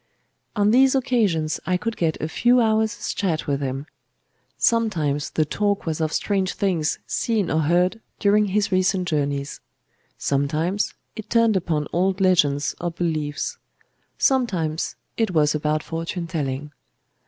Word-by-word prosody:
On 205 -1 +3
these 265 +3 +5
occasions 205 -12 +1
I 180 -1 +2
could 230 +4 -3
get 160 -2 -1
a 155 - -2
few 245 +9 +3
hours' 220 -1 +1
chat 170 -6 -1
with 140 -1 -1
him. 135 +1 -3 0.7
Sometimes 165 - +1
the 155 - +1
talk 200 +5 -1
was 160 -1 -2
of 155 -1 0
strange 195 0 0
things 175 -6 0
seen 220 -5 0
or 160 - +2
heard 180 +7 +2 0.2
during 210 +1 +3
his 200 +1 0
recent 185 0 +1
journey; 140 -3 0 0.7
sometimes 155 +8 0 0.2
it 220 -1 -8
turned 230 -2 +3
upon 160 -5 0
old 185 +2 +1
legends 150 -7 +2
or 175 - -1
beliefs; 155 -4 -3 0.6
sometimes 180 - 0 0.2
it 225 -2 +1
was 150 -1 +4
about 150 0 0
fortune 165 +2 -4
telling. 145 -3 -3
175 Hz, 140 wpm, -23 LUFS, 155-210 Hz, 0.7 s, these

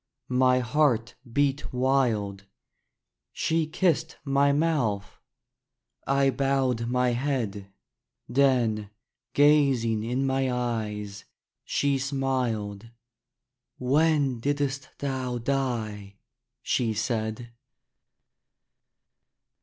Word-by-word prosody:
My 130 0 +4
heart 125 -3 +1 0.2
beat 145 +2 0
wild. 120 -7 0 0.9
She 160 -1 0
kissed 160 -1 0
my 140 0 +3
mouth. 140 -10 0 0.9
I 140 0 +3
bowed 130 -3 0
my 125 0 +2
head. 120 -6 -2 0.6
Then, 120 -5 +2 0.5
gazing 135 -7 +4
in 125 +4 -1
my 135 -1 +1
eyes, 105 -5 -3 0.4
she 140 -1 0
smiled: 125 -6 -2 0.9
"When 140 -1 +2
did'st 140 0 -1
thou 130 -3 -2
die?" 115 -6 -2 0.5
she 115 -4 0
said. 110 +1 -2
130 Hz, 75 wpm, -27 LUFS, 115-140 Hz, 0.9 s, My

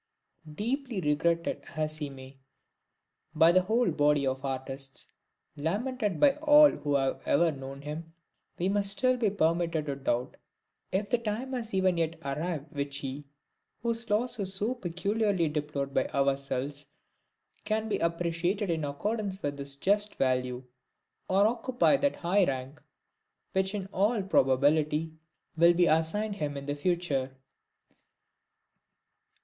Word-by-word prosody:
Deeply 240 - -2
regretted 170 +1 0
as 155 0 -1
he 150 -2 -4
may 130 -1 -11
be 135 - -27 1.0
by 160 +2 +6
the 185 +1 +5
whole 225 +6 +1
body 145 -1 +2
of 130 +1 -2
artists, 135 0 -5 0.4
lamented 205 - -2
by 290 -1 +6
all 300 -1 +7
who 145 -1 -2
have 135 -1 0
ever 165 +3 +4
known 135 0 -8
him, 155 +2 -6 0.5
we 180 - 0
must 200 0 +1
still 255 +5 +3
be 235 -4 +1
permitted 165 -4 0
to 140 -2 -3
doubt 125 -2 -2 0.5
if 200 +2 0
the 245 - +1
time 235 +4 -3
has 235 -3 -4
even 190 -2 +2
yet 165 0 0
arrived 150 +2 -3
in 150 - -13
which 140 0 -2
he, 140 +1 -5 0.6
whose 230 0 -1
loss 225 +3 0
is 190 -1 -1
so 215 +6 0
peculiarly 200 -2 0
deplored 150 -2 -3
by - - +1
ourselves, 140 +1 -1 0.8
can 220 0 -1
be 215 - -1
appreciated 170 +4 0
in 160 -2 -1
accordance 195 +7 -3
with 145 0 -3
his 140 0 -3
just 205 +7 +1
value, 125 -1 0 0.7
or 195 +2 +4
occupy 245 +4 +2
that 280 +1 +1
high 190 +4 +2
rank 135 -1 -3 0.7
which 190 +1 +1
in 195 -2 -3
all 205 +2 +2
probability 150 0 +2 0.4
will 170 +1 +5
be 175 0 +4
assigned 200 +7 +1
him 145 -4 -3
in 140 - -6
the 145 - -2
future. 145 -4 -1
170 Hz, 145 wpm, -29 LUFS, 140-205 Hz, 1.0 s, all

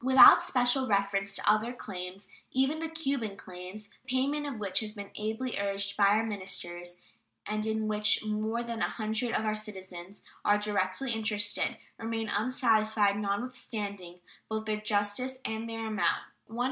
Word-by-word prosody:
Without 260 +1 +9
special 255 +1 +3
reference 200 -1 +1
to - - -2
other 215 +3 +4
claims, 190 -3 -7 0.2
even 270 +4 +2
the 325 0 -3
"Cuban 275 -10 -2
claims," 185 +3 -8
the - - -25
payment 280 +3 0
of 275 -5 -4
which 200 -3 +1
has 215 -1 -3
been 205 -2 -8
ably 220 +3 -3
urged 200 0 -1
by 200 - +5
our 210 +3 +4
ministers, 180 -4 -5 0.5
and 215 +1 -2
in 220 0 0
which 210 0 +2
more 215 +2 -1
than 235 -1 -4
a - - +2
hundred 220 +2 -1
of 220 - 0
our 215 - +1
citizens 190 -3 -7 0.2
are 205 - +4
directly 210 +4 0
interested, 210 -2 0 0.2
remain 225 -1 -2
unsatisfied, 215 -3 +2
notwithstanding 200 -4 -4 0.3
both 220 0 -2
their 215 -1 -1
justice 210 +5 0
and 220 +1 -3
their 225 0 -4
amount 210 -6 +1 0.3
($128,635. 225 +2 -7
215 Hz, 160 wpm, -30 LUFS, 200-230 Hz, 0.5 s, Without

